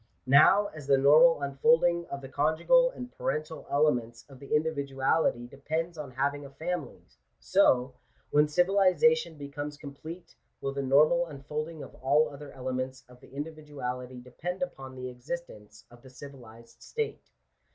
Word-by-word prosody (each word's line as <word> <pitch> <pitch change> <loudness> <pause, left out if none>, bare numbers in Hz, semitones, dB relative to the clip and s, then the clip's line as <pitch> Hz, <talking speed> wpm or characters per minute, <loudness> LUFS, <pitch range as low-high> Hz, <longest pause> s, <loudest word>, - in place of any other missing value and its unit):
Now 155 +10 +6
as 150 -3 -10
the 140 -1 +5
normal 150 +3 +6
unfolding 170 - +2
of 140 - -5
the 135 - -8
conjugal 160 - +3
and 250 - -9
parental 155 - -4
elements 125 -6 0
of 135 -2 -15
the 140 +2 -2
individuality 140 -4 0
depends 160 +7 -4
on 150 -4 -7
having 140 +3 -1
a 140 - -9
family, 160 +2 -5 0.4
so, 125 - +3 0.4
when 150 +1 +4
civilization 185 +3 +3
becomes 145 +1 -6
complete, 160 +5 -10 0.3
will 135 - -3
the 140 - -2
normal 155 +6 +4
unfolding 150 +2 -6
of - - -12
all 145 +4 +2
other 140 0 -10
ele 130 -1 -5
ments 130 +1 -4
of 125 0 -17
the - - -17
individuality 140 -4 -6
depend 160 - -5
upon 135 - -7
the 130 0 -6
existence 125 -6 -8
of 120 0 -16
the 130 - -14
civilized 120 -4 -13
state. 450 -1 -5
145 Hz, 150 wpm, -29 LUFS, 130-160 Hz, 0.4 s, Now